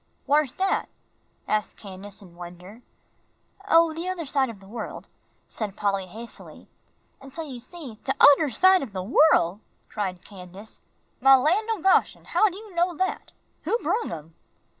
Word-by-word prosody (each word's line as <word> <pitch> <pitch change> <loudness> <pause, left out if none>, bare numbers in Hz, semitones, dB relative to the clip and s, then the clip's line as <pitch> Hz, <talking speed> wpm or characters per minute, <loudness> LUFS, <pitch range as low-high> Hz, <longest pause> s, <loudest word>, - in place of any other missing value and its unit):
"Whar's 290 -1 +2
dat?" 385 +5 -1 0.6
asked 215 0 -1
Candace, 200 0 -10
in 180 -3 -16
wonder. 180 +5 -11 0.9
"Oh, 330 -3 +5
the 335 +3 -4
other 360 -3 -4
side 270 -2 +1
of 220 -4 -9
the 195 - -16
world," 220 +1 -7 0.4
said 210 -3 -5
Polly, 195 -2 -1
hastily; 225 +5 -10 0.5
"and 270 0 -12
so 330 - -3
you 265 -5 -8
see 255 -4 -9
" - - -35
"De 265 - -1
oder 290 +1 +7
side 375 +10 +5
ob 240 -7 -7
de 185 -1 -3
worl'," 210 - +3 0.3
cried 185 -4 -4
Candace. 195 +2 -11 0.4
"My 270 +1 +7
lan' 345 - +2
o' 440 -7 -2
Goshen, 385 - +3
how 430 - +3
you 410 +1 -8
know 345 -1 0
dat? 375 - -2 0.3
Who 460 - +1
brung 460 - 0
him?" 160 0 -8
250 Hz, 160 wpm, -25 LUFS, -, 0.9 s, oder